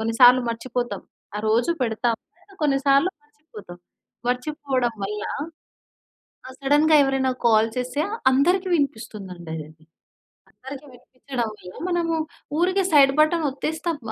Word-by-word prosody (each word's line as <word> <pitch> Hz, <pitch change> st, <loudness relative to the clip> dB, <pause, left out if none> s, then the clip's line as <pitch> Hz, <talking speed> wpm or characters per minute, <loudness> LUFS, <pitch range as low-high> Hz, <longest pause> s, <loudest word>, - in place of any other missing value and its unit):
కొన్నిసార్లు 245 Hz, +3 st, +6 dB
మర్చిపోతాం. 240 Hz, -3 st, -4 dB, 0.3 s
ఆ -, -, -2 dB
రోజు 235 Hz, +7 st, +2 dB
పెడతాం‌లే, 240 Hz, -, -3 dB
కొన్నిసార్లు 275 Hz, +3 st, +3 dB
మర్చిపోతాం. 290 Hz, -, -13 dB, 0.5 s
మర్చిపోవడం 255 Hz, -2 st, -1 dB
వల్ల, 210 Hz, +1 st, -4 dB, 1.3 s
ఆ! -, -, -8 dB
సడెన్‌గా 295 Hz, +3 st, +4 dB
ఎవరైనా 270 Hz, -1 st, +1 dB, 0.2 s
కాల్ 220 Hz, 0 st, +4 dB
చేస్తే 255 Hz, +4 st, -1 dB, 0.3 s
అందరికి 355 Hz, +8 st, +2 dB
వినిపిస్తుందండదది. 175 Hz, -, -5 dB, 0.7 s
అందరికి 270 Hz, +2 st, -10 dB
వినిపించడం 250 Hz, -1 st, -5 dB
వల్ల, 180 Hz, -2 st, -12 dB, 0.2 s
మనము 335 Hz, -2 st, 0 dB, 0.4 s
ఊరికే 370 Hz, +3 st, +2 dB
సైడ్ 275 Hz, -2 st, +7 dB
బటన్ 315 Hz, +1 st, +2 dB
ఒత్తేస్తాం 320 Hz, +3 st, -3 dB
265 Hz, 100 wpm, -23 LUFS, 225-300 Hz, 1.3 s, సైడ్